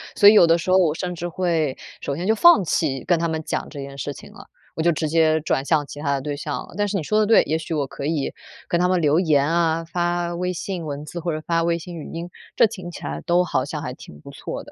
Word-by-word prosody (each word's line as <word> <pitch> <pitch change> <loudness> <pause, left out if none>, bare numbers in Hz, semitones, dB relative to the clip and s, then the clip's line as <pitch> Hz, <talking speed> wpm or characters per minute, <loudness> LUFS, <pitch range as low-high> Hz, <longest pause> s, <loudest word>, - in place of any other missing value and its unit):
所 205 - +8
以 - - +6
有 190 -5 +7
的 165 +1 +4
时 170 +2 -2
候 185 - +6
我 165 -5 +3
甚 180 +1 -3
至 175 0 -4
会 165 -5 -1 0.2
首 140 - -3
先 170 +5 -4
就 220 - +3
放 230 - +6
弃 145 -4 -1
跟 175 -2 +2
他 170 - 0
们 160 -1 -3
讲 - - -3
这 145 - -8
件 140 0 -8
事 140 +2 -4
情 - - -13
了， - - -13 0.3
我 - - -2
就 170 +1 +3
直 155 0 -2
接 160 0 +3
转 140 -3 -1
向 150 -1 +2
其 145 - -10
他 145 -1 0
的 135 - -1
对 145 +1 -4
象 145 -1 -4
了。 - - -15
但 205 0 +1
是 205 - -3
你 185 - -1
说 215 +8 +1
得 215 - +3
对， 225 +2 +5
也 155 +2 -1
许 165 +1 -5
我 145 -3 0
可 140 - -7
以 150 -2 -1 0.4
跟 170 - +1
他 180 - +3
们 180 -1 +1
留 150 +1 +3
言 150 -6 +3
啊， 165 0 +1
发 175 +1 -1
微 180 +1 -2
信 180 -1 -5
文 145 -1 -5
字 170 +3 -6
或 170 -1 -2
者 155 - -4
发 165 -1 +1
微 170 0 +1
信 170 +1 -8
语 155 - -8
音， 170 +1 -5 0.3
这 - - +6
听 195 -5 -5
起 - - -10
来 75 +1 -4
都 175 +1 +3
好 130 -7 -1
像 150 +1 -5
还 125 -5 -5
挺 75 - -13
不 - - -11
错 - - -6
的。 - - -15
165 Hz, 315 characters per minute, -22 LUFS, 150-175 Hz, 0.4 s, 所